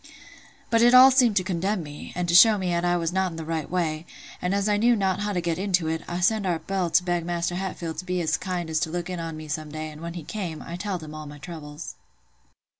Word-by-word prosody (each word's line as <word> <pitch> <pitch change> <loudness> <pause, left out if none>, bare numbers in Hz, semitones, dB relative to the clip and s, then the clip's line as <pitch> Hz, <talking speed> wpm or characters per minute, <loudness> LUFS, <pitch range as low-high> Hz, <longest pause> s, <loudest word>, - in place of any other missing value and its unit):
But 230 0 +4
all 260 +1 +10
seemed 250 -5 +4
to 185 - +3
condemn 190 +1 -1
me, 145 -1 -9
and 180 0 -1
to 170 - 0
show 210 +4 +8
me 185 -2 -1
"at 170 0 0
I 175 0 +2
was 165 0 -2
not 190 0 +1
in 165 - -9
the 160 - -5
right 160 -2 -3
way; 165 -2 -2 0.3
and 180 +2 0
as 200 +1 +1
I 210 - +3
knew 235 +3 +4
not 190 -3 0
how 205 0 -1
to 180 -3 -1
get 170 0 -2
into 185 -4 +1
it, 160 0 -2
I 175 +1 -3
sent 210 +1 +2
our 175 -2 +1
Bill 185 0 -2
to 180 - +3
beg 175 -2 -1
Maister 175 0 -2
Hatfield 175 -3 -4
to 185 - -6
be 180 -1 -1
as 160 -1 +1
kind 175 -4 -4
as 155 - +1
look 175 +2 -4
in 180 - -4
on 165 -1 -5
me 155 0 -8
some 150 +1 -4
day 155 0 -5
and 150 +1 -12
when 170 0 -6
he 170 - -6
came, 175 -3 -5
I 170 - -6
telled 185 -2 -4
him 155 0 -9
all 155 -1 -7
my 145 0 -10
troubles." 150 0 -8
175 Hz, 265 wpm, -25 LUFS, 160-190 Hz, 0.3 s, all